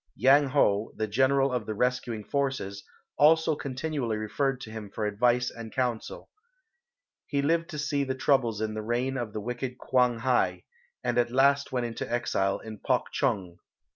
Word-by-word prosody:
Yang 135 Hz, +5 st, +5 dB
Ho, 110 Hz, -6 st, +2 dB
the 110 Hz, -, -1 dB
general 130 Hz, +4 st, +2 dB
of 120 Hz, -4 st, -2 dB
the 110 Hz, -, -3 dB
rescuing 125 Hz, -2 st, -1 dB
forces, 130 Hz, -8 st, -2 dB, 0.4 s
also 160 Hz, +1 st, +5 dB
continually 135 Hz, -4 st, -3 dB
referred 125 Hz, +5 st, -1 dB
to 110 Hz, -, -8 dB
him 110 Hz, -2 st, -7 dB
for 105 Hz, +2 st, -3 dB
advice 120 Hz, +4 st, +2 dB
and 115 Hz, -1 st, -9 dB
counsel. 125 Hz, -4 st, -3 dB, 1.0 s
He 140 Hz, -1 st, 0 dB
lived 165 Hz, +3 st, +1 dB
to 155 Hz, -, -6 dB
see 145 Hz, -1 st, 0 dB
the 130 Hz, -1 st, -2 dB
troubles 125 Hz, -6 st, +1 dB
in 110 Hz, -1 st, -1 dB
the 110 Hz, -, -4 dB
reign 120 Hz, +4 st, -1 dB
of 120 Hz, -4 st, -3 dB
the 105 Hz, -, -5 dB
wicked 125 Hz, +3 st, -4 dB
Kwang 125 Hz, -3 st, +2 dB
hai, 125 Hz, +2 st, +1 dB, 0.4 s
and 120 Hz, -, +1 dB
at 120 Hz, -, +2 dB
last 140 Hz, +3 st, +3 dB
went 125 Hz, -2 st, -1 dB
into 115 Hz, -1 st, -5 dB
exile 100 Hz, -5 st, 0 dB
to 110 Hz, -2 st, -8 dB
Puk -, -, 0 dB
chong. 90 Hz, -3 st, -1 dB
125 Hz, 170 wpm, -28 LUFS, 110-135 Hz, 1.0 s, Yang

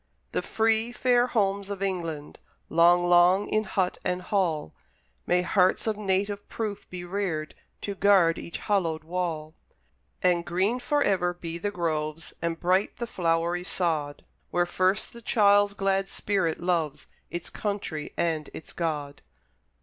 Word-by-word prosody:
The -, -, 0 dB
free, 225 Hz, +1 st, +1 dB
fair 245 Hz, 0 st, +3 dB
homes 200 Hz, -4 st, 0 dB
of 200 Hz, -1 st, -4 dB
England! 165 Hz, -6 st, -3 dB, 0.3 s
Long, 175 Hz, +2 st, +5 dB
long, 175 Hz, +3 st, +5 dB
in 215 Hz, 0 st, +1 dB
hut 190 Hz, -2 st, -1 dB
and 180 Hz, 0 st, -1 dB
hall, 175 Hz, -, 0 dB, 0.5 s
May 180 Hz, 0 st, +3 dB
hearts 185 Hz, 0 st, +2 dB
of 220 Hz, -1 st, 0 dB
native 200 Hz, 0 st, -1 dB
proof 215 Hz, -3 st, -4 dB
be 180 Hz, -1 st, -6 dB
reared 175 Hz, -5 st, -2 dB, 0.3 s
To 200 Hz, -, -3 dB
guard 190 Hz, -4 st, +4 dB
each 170 Hz, -, -6 dB
hallowed 170 Hz, -6 st, 0 dB
wall! 160 Hz, -2 st, -3 dB, 0.7 s
And 175 Hz, -1 st, +3 dB
green 190 Hz, +8 st, 0 dB
for 290 Hz, +4 st, +1 dB
ever 180 Hz, -3 st, +1 dB
be 170 Hz, -1 st, -6 dB
the 205 Hz, -, -1 dB
groves, 160 Hz, -4 st, -3 dB
And 170 Hz, 0 st, -2 dB
bright 185 Hz, +3 st, +1 dB
the 235 Hz, -, -3 dB
flowery 170 Hz, -3 st, 0 dB
sod, 160 Hz, -6 st, -2 dB, 0.2 s
Where 175 Hz, 0 st, +2 dB
first 185 Hz, +3 st, 0 dB
the 235 Hz, -, -10 dB
child's 205 Hz, -2 st, +4 dB
glad 195 Hz, 0 st, 0 dB
spirit 190 Hz, -6 st, -1 dB
loves 165 Hz, -5 st, -1 dB, 0.2 s
Its 175 Hz, -1 st, -5 dB
country 200 Hz, -7 st, -3 dB
and 160 Hz, -3 st, -1 dB
its 160 Hz, -, -9 dB
God! 150 Hz, -4 st, -3 dB
180 Hz, 145 wpm, -27 LUFS, 165-200 Hz, 0.7 s, Long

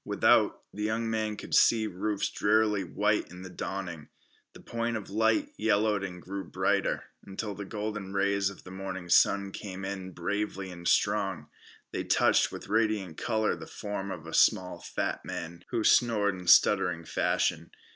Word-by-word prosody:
Without, -, -, +3 dB
the 105 Hz, -, -6 dB
young 110 Hz, +2 st, -1 dB
man 110 Hz, -1 st, -1 dB
could -, -, -8 dB
see 115 Hz, -2 st, +5 dB
roofs 100 Hz, +1 st, -2 dB
drearily 105 Hz, -1 st, +2 dB
white 105 Hz, +4 st, 0 dB
in 90 Hz, +1 st, -10 dB
the 95 Hz, -, -9 dB
dawning. 90 Hz, -4 st, -5 dB, 0.5 s
The -, -, -13 dB
point 115 Hz, 0 st, -2 dB
of 105 Hz, -2 st, -9 dB
light 110 Hz, +1 st, +2 dB
yellowed 105 Hz, -1 st, +2 dB
and 90 Hz, -2 st, -6 dB
grew 95 Hz, +2 st, -6 dB
brighter, -, -, 0 dB, 0.2 s
until 100 Hz, +2 st, -5 dB
the 100 Hz, 0 st, -7 dB
golden 105 Hz, -1 st, -4 dB
rays 100 Hz, 0 st, +1 dB
of 100 Hz, -, -12 dB
the 95 Hz, -, -11 dB
morning 95 Hz, -2 st, -6 dB
sun 100 Hz, +2 st, +4 dB
came 95 Hz, -1 st, -7 dB
in 95 Hz, -1 st, -5 dB
bravely 100 Hz, +2 st, -3 dB
and 85 Hz, -1 st, -7 dB
strong. 95 Hz, -8 st, +1 dB, 0.4 s
They -, -, -3 dB
touched -, -, +3 dB
with -, -, -8 dB
radiant 105 Hz, -5 st, 0 dB
color 110 Hz, -4 st, 0 dB
the 80 Hz, -1 st, -10 dB
form 100 Hz, -1 st, -5 dB
of 80 Hz, -4 st, -6 dB
a 80 Hz, -, -8 dB
small 95 Hz, -4 st, +3 dB
fat -, -, -3 dB
man, 85 Hz, +1 st, -7 dB
who 115 Hz, -, -1 dB
snored 105 Hz, -5 st, +4 dB
in 90 Hz, -1 st, -9 dB
stuttering 90 Hz, -2 st, +5 dB
fashion. -, -, 0 dB
100 Hz, 165 wpm, -29 LUFS, 95-105 Hz, 0.5 s, see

